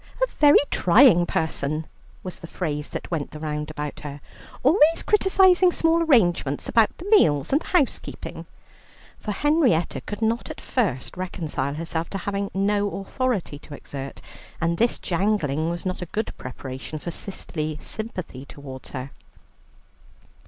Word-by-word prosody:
"A -, -, +4 dB
very 290 Hz, -1 st, +8 dB
trying 180 Hz, -2 st, +6 dB
person" 155 Hz, -1 st, -1 dB, 0.4 s
was 185 Hz, -, -6 dB
the 165 Hz, -, -10 dB
phrase 150 Hz, -4 st, -3 dB
that -, -, -6 dB
went 155 Hz, -4 st, -2 dB
the 150 Hz, -, -9 dB
round 150 Hz, -1 st, -3 dB
about 150 Hz, -1 st, -5 dB
her, 145 Hz, -1 st, -7 dB, 0.4 s
"always 315 Hz, +3 st, +5 dB
criticizing 380 Hz, -3 st, +5 dB
small 330 Hz, 0 st, +2 dB
arrangements 175 Hz, -, +2 dB
about 225 Hz, -2 st, +3 dB
the 350 Hz, -, -9 dB
meals 145 Hz, -, +4 dB
and 290 Hz, -, +4 dB
the -, -, -11 dB
housekeeping," 335 Hz, -8 st, -1 dB, 0.7 s
for 210 Hz, -, -4 dB
Henrietta 270 Hz, -, +2 dB
could 210 Hz, +2 st, -5 dB
not 230 Hz, +2 st, 0 dB
at -, -, -7 dB
first 190 Hz, -, -1 dB
reconcile 160 Hz, -6 st, -3 dB
herself 165 Hz, +1 st, -3 dB
to 195 Hz, -, -4 dB
having 200 Hz, +1 st, -2 dB
no 205 Hz, +1 st, +1 dB
authority 200 Hz, -, -2 dB
to 150 Hz, -, -10 dB
exert, 135 Hz, -1 st, -8 dB, 0.4 s
and 170 Hz, 0 st, 0 dB
this 235 Hz, +1 st, +2 dB
jangling 170 Hz, -5 st, 0 dB
was 170 Hz, +1 st, -4 dB
not 185 Hz, 0 st, -2 dB
a 180 Hz, -, -4 dB
good 215 Hz, +6 st, -3 dB
preparation 130 Hz, +3 st, -7 dB
for 170 Hz, +3 st, -5 dB
sisterly 155 Hz, -4 st, -5 dB
sympathy 185 Hz, -, -6 dB
towards 140 Hz, -2 st, -10 dB
her. 130 Hz, 0 st, -6 dB
175 Hz, 145 wpm, -24 LUFS, 150-230 Hz, 0.7 s, very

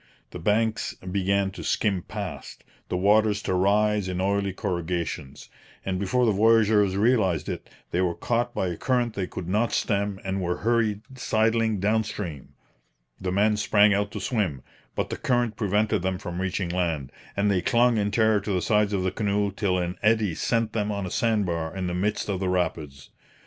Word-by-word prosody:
The 90 Hz, -, -7 dB
banks 110 Hz, +5 st, 0 dB
began 95 Hz, +1 st, 0 dB
to 95 Hz, -, -9 dB
skim 100 Hz, -4 st, 0 dB
past, -, -, -7 dB, 0.3 s
the 90 Hz, -, -1 dB
waters 105 Hz, +2 st, +3 dB
to -, -, -1 dB
rise 105 Hz, +2 st, +2 dB
in 90 Hz, 0 st, -3 dB
oily 100 Hz, +1 st, 0 dB
corrugations; 85 Hz, -6 st, -4 dB, 0.4 s
and 95 Hz, -1 st, -1 dB
before 110 Hz, +6 st, +1 dB
the 110 Hz, -, +4 dB
voyageurs 105 Hz, -2 st, +4 dB
realized 105 Hz, -6 st, +2 dB
it, -, -, -5 dB, 0.2 s
they 90 Hz, -, +1 dB
were 90 Hz, -2 st, 0 dB
caught 120 Hz, 0 st, -1 dB
by 95 Hz, -, 0 dB
a 85 Hz, -, -4 dB
current 120 Hz, -3 st, 0 dB
they 95 Hz, -4 st, -3 dB
could 90 Hz, -, -7 dB
not 105 Hz, +5 st, +1 dB
stem 100 Hz, -1 st, 0 dB
and 95 Hz, 0 st, -2 dB
were 90 Hz, 0 st, -1 dB
hurried 115 Hz, -3 st, +2 dB, 0.2 s
sidling 110 Hz, -2 st, +1 dB
down 110 Hz, +3 st, +2 dB
stream. 85 Hz, -10 st, -7 dB, 0.6 s
The 95 Hz, -1 st, -2 dB
men 105 Hz, +3 st, +2 dB
sprang 105 Hz, 0 st, +4 dB
out 100 Hz, +1 st, 0 dB
to -, -, -4 dB
swim, 95 Hz, -, -1 dB, 0.3 s
but -, -, -2 dB
the -, -, -3 dB
current 120 Hz, -3 st, 0 dB
prevented 105 Hz, 0 st, +1 dB
them 95 Hz, 0 st, -1 dB
from 90 Hz, -2 st, -5 dB
reaching 95 Hz, -1 st, -2 dB
land, 85 Hz, -6 st, -1 dB, 0.3 s
and 100 Hz, +1 st, +2 dB
they 95 Hz, -2 st, +1 dB
clung 120 Hz, +2 st, +3 dB
in 100 Hz, 0 st, +1 dB
terror 110 Hz, 0 st, +3 dB
to 105 Hz, +1 st, -4 dB
the 90 Hz, -2 st, +1 dB
sides 105 Hz, -1 st, +2 dB
of 95 Hz, -2 st, 0 dB
the 95 Hz, -, 0 dB
canoe 100 Hz, 0 st, 0 dB
till 95 Hz, -2 st, 0 dB
an 90 Hz, 0 st, -2 dB
eddy 110 Hz, -3 st, +2 dB
sent 115 Hz, +5 st, 0 dB
them 105 Hz, -1 st, -1 dB
on 100 Hz, -2 st, -3 dB
a 90 Hz, -, -5 dB
sand 110 Hz, -3 st, +1 dB
bar 85 Hz, -1 st, -3 dB
in 95 Hz, -, -2 dB
the 90 Hz, -, -2 dB
midst 100 Hz, +4 st, -1 dB
of 100 Hz, -3 st, -2 dB
the 95 Hz, -1 st, -1 dB
rapids. 80 Hz, -6 st, -2 dB
100 Hz, 190 wpm, -25 LUFS, 90-110 Hz, 0.6 s, the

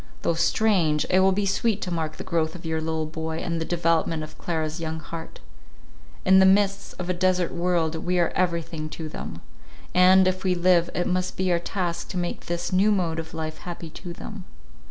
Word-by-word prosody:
Though -, -, +2 dB
strange, 170 Hz, -3 st, +2 dB
it 185 Hz, -, +5 dB
will 190 Hz, 0 st, +5 dB
be 200 Hz, +2 st, 0 dB
sweet 210 Hz, +2 st, +1 dB
to 180 Hz, -, -4 dB
mark 155 Hz, -2 st, -3 dB
the -, -, -6 dB
growth 160 Hz, -1 st, -1 dB
of 175 Hz, -, -10 dB
your 160 Hz, 0 st, -1 dB
little 160 Hz, 0 st, -1 dB
boy, 160 Hz, +1 st, -4 dB
and 165 Hz, 0 st, -2 dB
the -, -, -1 dB
development 165 Hz, -2 st, +1 dB
of 155 Hz, -, -9 dB
Clara's 160 Hz, -1 st, -3 dB
young 160 Hz, -1 st, -3 dB
heart. 160 Hz, +1 st, -8 dB, 0.9 s
In 190 Hz, 0 st, +7 dB
the 190 Hz, -, +7 dB
midst 200 Hz, +1 st, +2 dB
of 180 Hz, -, -5 dB
a 180 Hz, -, +1 dB
desert 180 Hz, 0 st, +1 dB
world, 170 Hz, -2 st, 0 dB
we 175 Hz, +2 st, -1 dB
are 170 Hz, -1 st, +3 dB
everything 170 Hz, -3 st, -1 dB
to 160 Hz, -, -4 dB
them; -, -, -7 dB, 0.5 s
and, 185 Hz, +1 st, +6 dB
if 185 Hz, 0 st, -1 dB
we 185 Hz, -1 st, +2 dB
live, 175 Hz, -1 st, +3 dB
it 175 Hz, -, 0 dB
must 185 Hz, 0 st, -1 dB
be 185 Hz, -1 st, +1 dB
our 170 Hz, -, +3 dB
task 175 Hz, -1 st, -3 dB
to 185 Hz, -, -4 dB
make 175 Hz, -1 st, -3 dB
this 175 Hz, +1 st, -2 dB
new 195 Hz, +3 st, +4 dB
mode 170 Hz, -5 st, 0 dB
of 160 Hz, 0 st, -7 dB
life 155 Hz, -1 st, -4 dB
happy 170 Hz, -2 st, -7 dB
to 175 Hz, +2 st, -8 dB
them. 190 Hz, +2 st, -8 dB
175 Hz, 210 wpm, -25 LUFS, 160-185 Hz, 0.9 s, In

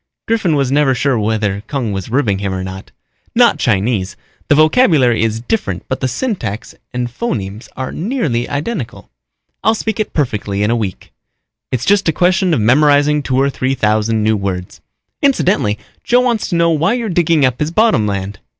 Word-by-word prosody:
Griffin 215 Hz, -8 st, +1 dB
was 135 Hz, -2 st, 0 dB
never 140 Hz, -2 st, +3 dB
sure 135 Hz, -2 st, +1 dB
whether 105 Hz, -2 st, -1 dB
Kung 130 Hz, -7 st, -2 dB
was 95 Hz, -1 st, -4 dB
ribbing 110 Hz, -6 st, +1 dB
him 100 Hz, -1 st, -2 dB
or 95 Hz, -, -3 dB
not. 95 Hz, +1 st, -8 dB, 0.5 s
"Not -, -, +4 dB
Chinese. 100 Hz, -1 st, 0 dB, 0.3 s
The -, -, +4 dB
vocabulary 155 Hz, -, +4 dB
is 110 Hz, 0 st, 0 dB
different 105 Hz, -, -2 dB
but 130 Hz, -, -2 dB
the 130 Hz, -, 0 dB
syntax 125 Hz, -, -4 dB, 0.2 s
and 125 Hz, -1 st, -2 dB
phonemes 110 Hz, -, -4 dB
are 130 Hz, 0 st, -4 dB
nearly 160 Hz, -, -2 dB
identical. 145 Hz, -, -4 dB, 0.5 s
I'll 220 Hz, -, +3 dB
speak 220 Hz, +1 st, -3 dB
it 215 Hz, -, -1 dB
perfectly 105 Hz, -8 st, -1 dB
in 105 Hz, -, +1 dB
a -, -, +2 dB
week. 105 Hz, -5 st, -5 dB, 0.6 s
It's 125 Hz, 0 st, -1 dB
just 200 Hz, -2 st, +3 dB
a -, -, +1 dB
question 185 Hz, +2 st, +2 dB
of 160 Hz, -, +2 dB
memorizing 145 Hz, +5 st, +3 dB
two 130 Hz, -2 st, 0 dB
or 140 Hz, +1 st, +2 dB
three 130 Hz, 0 st, -1 dB
thousand 110 Hz, 0 st, +1 dB
new 110 Hz, 0 st, +2 dB
words. 95 Hz, -3 st, -4 dB, 0.4 s
Incidentally, 190 Hz, -, +2 dB, 0.3 s
Joe 245 Hz, +1 st, +3 dB
wants 240 Hz, -4 st, 0 dB
to 175 Hz, -, -2 dB
know 170 Hz, 0 st, +3 dB
why 165 Hz, +7 st, +2 dB
you're 235 Hz, -2 st, -3 dB
digging 170 Hz, -5 st, +2 dB
up 125 Hz, -1 st, -1 dB
his 150 Hz, -, 0 dB
bottom 170 Hz, -, +2 dB
land. 100 Hz, 0 st, -4 dB
130 Hz, 180 wpm, -16 LUFS, 105-170 Hz, 0.6 s, Not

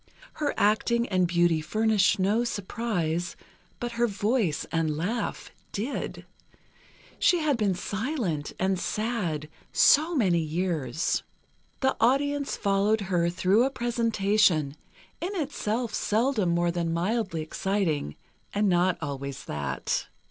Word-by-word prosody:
Her 295 Hz, -2 st, -2 dB
acting 235 Hz, +3 st, +2 dB
and 185 Hz, -2 st, +2 dB
beauty 170 Hz, -2 st, +2 dB
furnished 215 Hz, +4 st, +2 dB
no 205 Hz, +5 st, +2 dB
surprise, 185 Hz, -6 st, -2 dB, 0.4 s
but 240 Hz, 0 st, -3 dB
her 235 Hz, 0 st, +1 dB
voice 205 Hz, -, 0 dB
and 160 Hz, -2 st, 0 dB
laugh 205 Hz, +7 st, -3 dB, 0.2 s
did; 230 Hz, +8 st, -4 dB, 0.9 s
she 355 Hz, -, +4 dB
had 305 Hz, -4 st, +1 dB
been 205 Hz, -5 st, +1 dB
silent, 205 Hz, -, -2 dB
and 190 Hz, 0 st, 0 dB
sad, 195 Hz, -9 st, -2 dB, 0.2 s
so 320 Hz, +4 st, +5 dB
many 185 Hz, -, +3 dB
years. 160 Hz, -4 st, -1 dB, 0.6 s
The 265 Hz, 0 st, +2 dB
audience 280 Hz, +4 st, +1 dB
followed 200 Hz, +2 st, +2 dB
her 170 Hz, -1 st, +3 dB
through 185 Hz, +6 st, +3 dB
a 265 Hz, -, +2 dB
presentation, 210 Hz, -, +1 dB, 0.5 s
in 380 Hz, +4 st, -3 dB
itself 245 Hz, -, -2 dB
seldom 220 Hz, -3 st, +1 dB
more 170 Hz, 0 st, +2 dB
than 170 Hz, -1 st, -1 dB
mildly 180 Hz, -1 st, -1 dB
exciting, 160 Hz, -, -1 dB, 0.4 s
and 205 Hz, 0 st, +2 dB
not 180 Hz, 0 st, +3 dB
always 140 Hz, -1 st, -5 dB
that. 75 Hz, -1 st, -2 dB
200 Hz, 120 wpm, -27 LUFS, 170-235 Hz, 0.9 s, so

